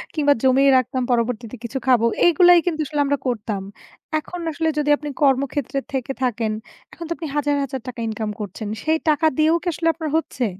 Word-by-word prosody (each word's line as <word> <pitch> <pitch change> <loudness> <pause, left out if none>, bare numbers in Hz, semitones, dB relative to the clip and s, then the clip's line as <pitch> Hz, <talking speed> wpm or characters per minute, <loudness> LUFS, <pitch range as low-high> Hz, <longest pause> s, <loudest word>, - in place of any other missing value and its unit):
কিংবা 290 -2 +4
জমিয়ে 265 +1 +5
রাখতাম, 255 +1 -1
পরবর্তিতে 235 0 -1
কিছু 250 +3 -4
খাবো। 240 -3 +4 0.2
এগুলাই 350 +1 +6
কিন্তু 320 -3 -1
আসলে 295 0 -3
আমরা 285 0 +1
করতাম। 210 -4 -2 0.6
এখন 355 +3 -8
আসলে 320 +1 -1
যদি 295 0 0
আপনি 295 0 -6
কর্মক্ষেত্রে 275 0 +1
থেকে 265 0 -2
থাকেন, 230 -3 0 0.4
এখন 335 - -8
তো - - -10
আপনি 320 - -5
হাজার, 290 0 +1
হাজার 265 -2 -5
টাকা 245 -1 -7
ইনকাম 220 -1 -3
করছেন। 210 +1 -6 0.2
সেই 315 +1 +2
টাকা 305 +1 +2
দিয়েও 315 +2 +4
কি - - -6
আসলে 330 +2 -2
আপনার 320 -2 -4
হচ্ছে? 255 -6 -2
275 Hz, 185 wpm, -21 LUFS, 240-310 Hz, 0.6 s, এগুলাই